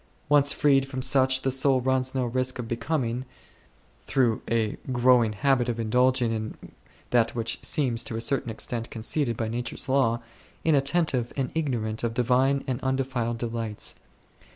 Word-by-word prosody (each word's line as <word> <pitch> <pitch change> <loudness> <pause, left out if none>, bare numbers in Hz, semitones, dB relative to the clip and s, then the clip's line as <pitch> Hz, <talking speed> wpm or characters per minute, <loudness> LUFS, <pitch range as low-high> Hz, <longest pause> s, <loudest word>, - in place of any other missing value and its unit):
Once 145 -1 +5
freed 135 -2 +3
from 130 -1 -5
such, 130 -1 +4
the 135 - +1
soul 135 0 +2
runs 130 +1 0
no 130 -1 +1
risk 130 +2 -1
of 120 -2 -5
becoming, 120 0 -2 0.8
through 120 -5 0
a 110 -2 0 0.2
growing 120 -3 +4
habit 130 +1 +1
of 115 -1 -2
indulging 125 +2 +2
in 110 -1 -4 0.5
that 115 -2 +2
which 115 -1 -2
seems 125 -7 0
to 110 - -6
a - - -2
certain 120 +1 0
extent 115 +1 -3
conceded 115 +2 -2
by 115 - -2
nature's 120 +4 -3
law, 130 -4 +2 0.4
in 160 - +3
attentive 140 -3 +1
and 135 -2 -1
ignorant 120 -9 -2
of 115 -1 -2
Divine 130 +3 +2
and 130 -2 -3
undefiled 130 -3 -1
delights. 115 -2 -2
125 Hz, 155 wpm, -26 LUFS, 115-135 Hz, 0.8 s, Once